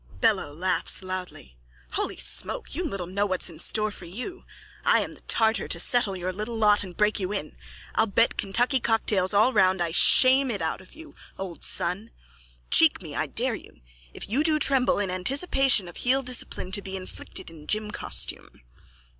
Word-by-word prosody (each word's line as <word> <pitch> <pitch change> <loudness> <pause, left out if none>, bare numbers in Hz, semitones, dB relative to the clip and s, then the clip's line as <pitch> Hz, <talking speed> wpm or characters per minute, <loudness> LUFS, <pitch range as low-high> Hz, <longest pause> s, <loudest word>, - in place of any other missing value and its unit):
BELLO: 215 -10 +1
(Laughs 185 +4 0
loudly.) 185 - -8 0.3
Holy - - -2
smoke! - - +1
You 345 +6 -2
little 195 - -4
know 200 +3 -2
what's 185 -2 -1
in 160 - -14
store 215 +4 +1
for 190 - -10
you. 250 - -8 0.4
I'm - - +1
the - - -16
Tartar 220 -1 +2
to - - -2
settle 240 -6 +2
your 185 +1 -4
little 215 +4 -5
lot 210 -2 +4
and 180 -3 -11
break 210 0 +1
you 185 0 -3
in! 195 - -5 0.4
I'll 220 - +2
bet 230 +3 +1
Kentucky 245 +7 +1
cocktails 215 -5 0
all 215 +5 +3
round 190 -3 +3
I 170 -1 -1
shame 260 +9 +6
it 210 -4 -2
out 160 +1 -3
of 185 - -17
you, 315 -1 -13 0.2
old 185 -3 -7
son. 190 +6 +1 0.6
Cheek - - +6
me, - - -9
I - - -2
dare - - -2
you. - - -11 0.3
If - - -7
you 255 +9 0
do 310 -1 +3
tremble 270 -4 +2
in 200 -2 -1
anticipation 265 - +1
of 175 - -11
heel 265 +2 +1
discipline 245 -6 -3
to 200 - -1
be 195 -1 -6
inflicted 185 -2 -7
in 155 -2 -14
gym 215 0 -2
costume. - - -2
205 Hz, 185 wpm, -25 LUFS, 185-245 Hz, 0.6 s, shame